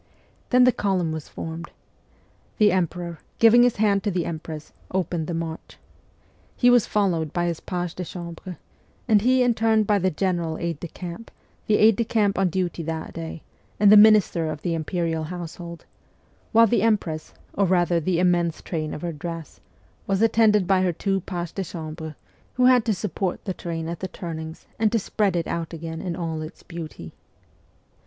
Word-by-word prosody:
Then 250 0 +5
the 255 - +6
column 190 -7 0
was 155 -1 -6
formed. 165 +1 -6 0.9
The 210 -1 +5
emperor, 175 -2 -2 0.2
giving 230 +1 +7
his 245 -1 +4
hand 200 -2 +2
to 210 - -1
the 180 -3 -1
empress, 155 -2 -6 0.2
opened 175 -3 -2
the 170 - -2
march. 165 -1 -6 0.8
He 245 -1 +5
was 245 -3 +4
followed 175 -7 0
by 175 0 0
his 170 -2 -2
page 175 -2 -4
de 180 - -5
chambre, 175 0 -8 0.5
and 215 -3 +5
he 255 +3 +4
in 245 -1 +3
turn 220 -1 +3
by 205 -1 +2
the 185 0 +2
general 170 -2 -1
aide 170 -3 -3
de 175 - -5
camp, 180 +6 -8 0.4
the 210 - +4
aide 215 -1 +5
de 235 - +2
camp 210 -4 +1
on 190 -2 +3
duty 175 -1 -2
that 160 0 -5
day, 165 -1 -7 0.4
and 205 0 +6
the - - +10
minister 205 -6 +6
of 150 -1 -6
the 175 - 0
imperial 165 0 -2
household; 170 0 -7 0.7
while 230 +1 +7
the 225 -2 +2
empress, 195 -8 0 0.2
or 200 -1 +2
rather 175 -1 +2
the 170 +2 0
immense 175 -2 +2
train 155 -3 -3
of 150 - -8
her 170 -1 -2
dress, 165 0 -7 0.5
was 195 -1 +1
attended 220 -3 +4
by 190 0 +3
her 185 -1 +2
two 195 +3 -1
pages 175 -3 -4
de 195 - -3
chambre, 160 -2 -7 0.4
who 250 - +3
had 250 -2 +6
to 225 - +2
support 185 -1 -3
the 190 - -2
train 165 -2 -5
at 170 0 -5
the 190 - -3
turnings 160 -3 -7
and 220 -1 +3
to 230 - +2
spread 200 -2 0
it 170 -1 0
out 170 0 -4
again 165 0 -6
in 175 -2 -3
all 165 -3 -3
its 155 +1 -9
beauty. 160 - -8
175 Hz, 185 wpm, -24 LUFS, 165-205 Hz, 0.9 s, the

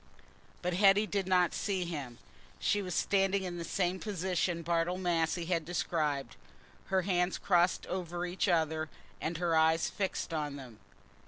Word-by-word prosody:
But 180 0 0
Hetty 200 +3 +5
did 200 -3 -2
not 180 -2 +3
see 190 -3 -1
him. 140 -8 -5 0.4
She 205 - +1
was 180 -3 -4
standing 195 0 +2
in 175 -2 -4
the - - -3
same 180 +2 -1
position 180 -4 -1
Bartle 170 +2 0
Massey 170 -2 0
had 170 -1 0
described, 150 -6 -1 0.5
her 190 -1 +1
hands 180 -1 +1
crossed 175 -1 +2
over 175 -1 -3
each 180 +3 -1
other 160 -3 +1 0.3
and 165 +1 -2
her 170 -1 +1
eyes 160 +1 +3
fixed 190 -3 -2
on 150 -3 -2
them. 125 -6 -10
175 Hz, 155 wpm, -32 LUFS, 160-185 Hz, 0.5 s, Hetty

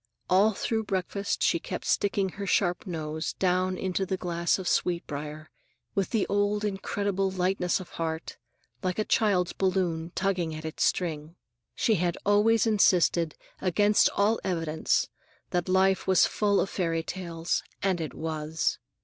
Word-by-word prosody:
All 200 +4 +5
through 220 +2 -1
breakfast 200 +1 -2
she - - +3
kept - - -6
sticking 200 -1 +1
her 200 +2 -6
sharp 180 +1 +1
nose 160 -2 -3
down 185 0 +1
into 190 +1 -1
the 190 0 -2
glass 170 -1 0
of 190 -2 -5
sweet 175 -1 +1
briar, 150 +1 -7 0.4
with 195 -3 0
the 220 -4 +1
old 205 +1 0
incredible 195 -1 -1
lightness 185 -1 0
of 185 - -9
heart, 160 0 -3 0.4
like 185 -2 -2
a 215 - 0
child's 185 -5 +2
balloon 180 -3 0
tugging 180 -5 0
at 155 0 -7
its 160 - -2
string. 160 -2 -1 0.4
She 225 -5 +2
had 175 -1 0
always 210 +3 +4
insisted, 180 -6 +3 0.3
against 205 +3 +4
all 210 +3 +2
evidence, 165 -4 0 0.4
that 175 0 -1
life 190 +1 +3
was 190 -1 +5
full 205 -1 +1
of 195 - -1
fairy 165 -3 -1
tales, 170 -2 -3 0.2
and 190 -3 +1
it 155 - -5
was! 160 0 -2
185 Hz, 150 wpm, -28 LUFS, 165-200 Hz, 0.4 s, All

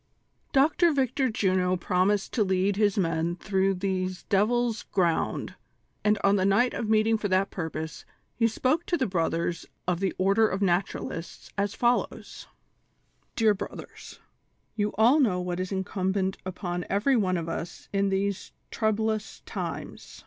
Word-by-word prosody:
p. 270 - +3 0.3
VICTOR 265 -2 +1
JUNO 185 -3 +1
promised 185 +3 +1
to 225 - +3
lead 190 +1 +1
his 205 -1 +2
men 165 -2 0
through 195 +1 0
these 185 -1 -2
devils' 225 +3 +1
ground, 175 -4 0 0.5
and 210 0 +3
on 200 +1 +4
the 185 - +1
night 200 +6 +3
of 220 - -3
meeting 220 0 +3
for 210 - -1
that 190 +1 +1
purpose, 160 -2 -5 0.3
he 230 - +2
spoke 260 +8 0
to 345 - +1
the 265 - +1
brothers 170 -2 -1 0.2
of 180 -2 +1
the 195 -1 0
" - - -41
Order 200 +4 +3
of 190 - -2
Naturalists," 180 -3 -2
as 200 +1 -1
follows: 240 0 -1 0.9
"Dear 220 -2 +4
Brothers 195 - -9 0.3
:— - - -45
You 210 -1 0
all 240 +8 +5
know 210 -10 +2
what 180 0 -3
is 185 +1 -3
incumbent 190 0 -1
upon 180 -1 -3
every 210 +8 +2
one 185 -6 +1
of 165 -1 -4
us 165 +1 -6
in 200 0 +2
these 195 0 -1 0.2
troublous 220 0 -1
times. - - -6
195 Hz, 155 wpm, -27 LUFS, 185-220 Hz, 0.9 s, all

